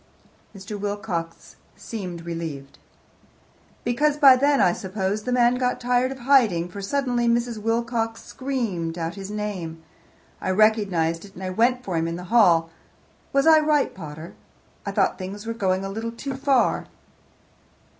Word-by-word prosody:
Mr. 200 +2 -7
Wilcox 195 -5 -4 0.2
seemed 180 -7 -7
relieved. 160 -5 -6 1.0
"Because 285 +5 +1
by 275 -3 +8
then 280 +2 +3
I 175 - +4
suppose 190 +2 -3
the 250 - -4
man 245 0 +3
got 250 -1 0
tired 250 +1 +1
of 270 - -6
hiding, 225 -10 +3
for 200 +2 -8
suddenly 245 +1 0
Mrs. 235 -1 0
Wilcox 225 0 -1
screamed 220 -12 -3
out 165 +1 -3
his 195 -1 -8
name. 190 -6 -5 0.6
I - - -2
recognized 185 -5 +2
it, 200 -1 -14
and 190 - -8
I 185 - -3
went 245 +5 +2
for 185 -7 -2
him 165 0 0
in 165 - -3
the 180 - -7
hall. 170 -8 +5 0.6
Was 275 0 +2
I 320 -1 +7
right, 300 -2 +2
pater? 155 -2 -9 0.5
I - - -1
thought - - +1
things 195 +3 -6
were 230 - -2
going 190 -3 0
a - - -4
little 225 +3 -4
too 270 +4 -5
far." 265 -1 +1
210 Hz, 155 wpm, -24 LUFS, 180-245 Hz, 1.0 s, by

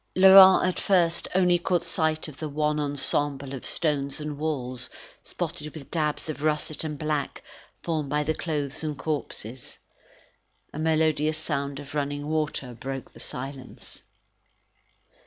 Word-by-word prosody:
Laurent 190 0 +9
at 185 - -1
first 170 -3 +2
only 180 -2 +4
caught 175 -1 0
sight 160 -1 0
of 145 -3 -10
the 155 - -4
wan 150 +1 0
ensemble 145 -1 0
of 130 - -6
stones 140 -4 -1
and 150 -1 -4
walls, 130 -5 -3 0.3
spotted 150 +1 -5
with 145 -4 -10
dabs 155 -2 -1
of 155 -2 -5
russet 155 0 0
and 150 -2 -4
black 150 -1 -2 0.4
formed 155 -4 -2
by 150 +1 +1
the 155 +2 0
clothes 150 -2 -3
and 150 -2 -3
corpses. 130 -5 -4 1.0
A 150 - -5
melodious 155 -1 +2
sound 140 -3 -3
of 145 -1 -10
running 145 0 -2
water 150 -5 -2
broke 135 +3 -6
the - - -14
silence. 130 0 -7
150 Hz, 140 wpm, -26 LUFS, 140-160 Hz, 1.0 s, Laurent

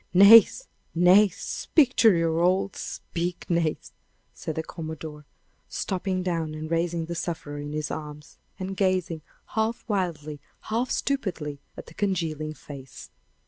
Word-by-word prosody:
Nace! 225 - +8 0.3
Nace! 180 +3 +5
speak 280 -6 +2
to 225 - +7
your 165 -2 +1
old 185 +2 +2
speak, 175 +1 -4
Nace!" 170 -3 0 0.5
cried 160 - -3
the 160 - -2
commodore, 155 -3 -8 0.4
stooping 185 -1 -2
down 165 -4 -2
and 155 +1 -6
raising 165 0 0
the 170 - -5
sufferer 160 -4 -4
in 145 0 -6
his 155 -1 -3
arms, 150 -1 -8 0.2
and 190 +1 -5
gazing, 185 -4 0 0.3
half 220 +1 -1
wildly, 165 -8 -2 0.3
half 235 +3 0
stupidly, 175 - -2 0.2
at - - -8
the - - -14
congealing 160 -6 -2
face. 135 -4 -11
170 Hz, 135 wpm, -26 LUFS, 155-190 Hz, 0.5 s, Nace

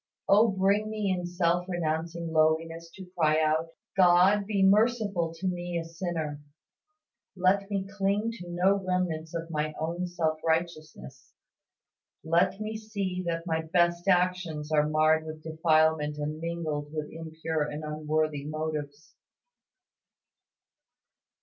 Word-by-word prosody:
Oh 210 +3 +6
bring 200 +1 +1
me 210 -2 -1
in 180 -1 -4
self 175 0 0
renouncing 165 -1 -2
lowliness 165 +1 +1
to 190 - -9
cry 155 -2 +3
out, 160 +1 +1 0.3
"God 190 +2 +5
be 200 -3 +1
merciful 205 -4 +2
to 175 +4 -7
me 175 -1 -2
a 165 - -3
sinner." 165 -3 -4 0.9
Let 195 +2 +2
me 195 -1 -2
cling 200 +3 0
to 175 0 -9
no 190 +3 +2
remnants 170 -3 -2
of 165 0 -4
my 155 0 -2
own 170 +3 -2
self 160 -3 -1
righteousness. 155 -6 -3 0.9
Let 170 +4 +2
me 215 +1 -4
see 200 -4 -3
that 165 0 -2
my 160 -2 0
best 170 +2 +1
actions 180 -5 +1
are 150 -1 +3
marred 155 +1 +3
with 155 0 -8
defilement 155 -2 +2
and 150 +1 -4
mingled 160 -3 -3
with 155 -1 -5
impure 160 -1 -4
and 150 +1 -3
unworthy 155 -1 -1
motives. 155 -1 -5
165 Hz, 130 wpm, -28 LUFS, 155-185 Hz, 0.9 s, Oh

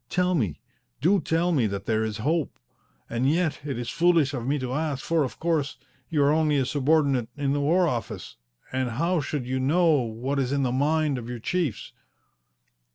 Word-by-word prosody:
Tell 180 0 +1
me! 110 - -1 0.4
Do 190 +7 +3
tell 165 +3 +1
me 130 -9 +2
that 100 -1 -5
there 110 -1 +1
is 110 -1 -3
hope! 160 0 0 0.5
And 120 +3 0
yet 170 -1 0
it 140 -4 -4
is 120 -1 -4
foolish 165 -4 +3
of 125 -2 -4
me 145 +2 +1
to 130 -2 -3
ask, 150 -2 -2
for, 165 -2 +2
of 130 - -5
course, 160 -4 0 0.3
you 150 -3 +2
are 140 - +4
only 155 -2 +2
a 135 - +2
subordinate 140 -3 +2
at 140 -1 0
the 145 - 0
War 170 +5 +3
Office, 120 -6 -4 0.4
and 130 -1 -1
how 165 +8 0
should 140 -2 -3
you 130 +1 -2
know 165 +6 +3
what 120 +5 -3
is 130 -1 0
in 140 -1 +1
the 125 - +1
mind 145 +1 +1
of 120 0 -8
your 120 - -4
chiefs?" 145 - -2
140 Hz, 200 wpm, -26 LUFS, 125-160 Hz, 0.5 s, are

